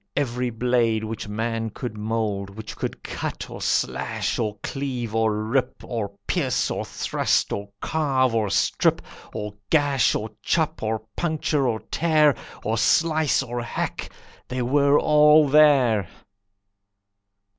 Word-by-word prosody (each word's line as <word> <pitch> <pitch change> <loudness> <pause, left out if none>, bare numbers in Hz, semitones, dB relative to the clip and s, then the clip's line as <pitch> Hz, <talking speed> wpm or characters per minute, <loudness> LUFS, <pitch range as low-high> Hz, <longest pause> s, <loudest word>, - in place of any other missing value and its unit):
Every 125 -3 -1
blade 115 -1 +1
which 110 -1 -5
man 115 +2 -2
could 120 +1 -6
mould, 105 -2 -2
Which 110 +2 -9
could - - -5
cut, - - -5
or - - -8
slash, - - -1
or 105 -3 -2
cleave, 125 -5 -4
or 110 -1 +1
rip, 125 +3 -1
Or 110 -5 -4
pierce, - - 0
or - - -2
thrust, - - 0
or 100 0 -5
carve, 135 -6 +1
or 110 -3 +1
strip, - - +1 0.3
Or 105 -1 -5 0.2
gash, 145 -4 +3
or 110 0 -3
chop, 160 +8 0
or 110 0 -2
puncture, 155 -4 0
or 110 -3 -1
tear, 155 -3 +4 0.3
Or 110 +1 0
slice, 160 -4 +3
or 120 -1 -4
hack, 120 - -4 0.4
they 125 - -4
all 150 +3 +5
were 140 - -3
there. 130 - +5
120 Hz, 135 wpm, -24 LUFS, 110-145 Hz, 0.4 s, all